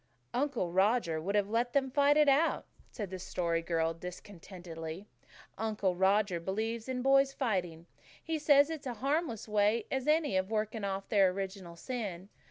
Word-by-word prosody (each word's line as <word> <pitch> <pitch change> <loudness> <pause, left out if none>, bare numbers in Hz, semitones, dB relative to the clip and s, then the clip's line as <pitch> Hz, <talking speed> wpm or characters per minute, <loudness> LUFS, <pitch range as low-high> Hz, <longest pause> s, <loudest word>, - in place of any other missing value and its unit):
"Uncle 255 -10 -1
Roger 190 -4 +2
would 200 +5 -2
have 205 -1 +2
let 240 +2 0
them 265 -2 +1
fight 285 +1 +4
it 300 -1 +5
out," 285 +4 +3 0.2
said 205 -6 -6
the 185 - -5
Story 170 -2 -1
Girl 165 -1 0
discontentedly. 175 -1 -9 0.5
"Uncle 210 -4 0
Roger 190 0 +2
believes 220 +6 -3
in 250 -1 -2
boys 275 0 +4
fighting. 180 - -2 0.4
He 320 -1 -2
says 290 0 +5
it's 300 -4 -6
as 240 -3 -5
harmless 275 -5 -1
a - - -12
way 210 +1 +2
as 265 +1 -2
any 305 -9 +2
of 190 +1 -1
working 215 0 -2
off 195 0 -3
their 195 -3 +5
original 190 -2 -5
sin. 195 -3 -5
210 Hz, 170 wpm, -32 LUFS, 185-260 Hz, 0.5 s, it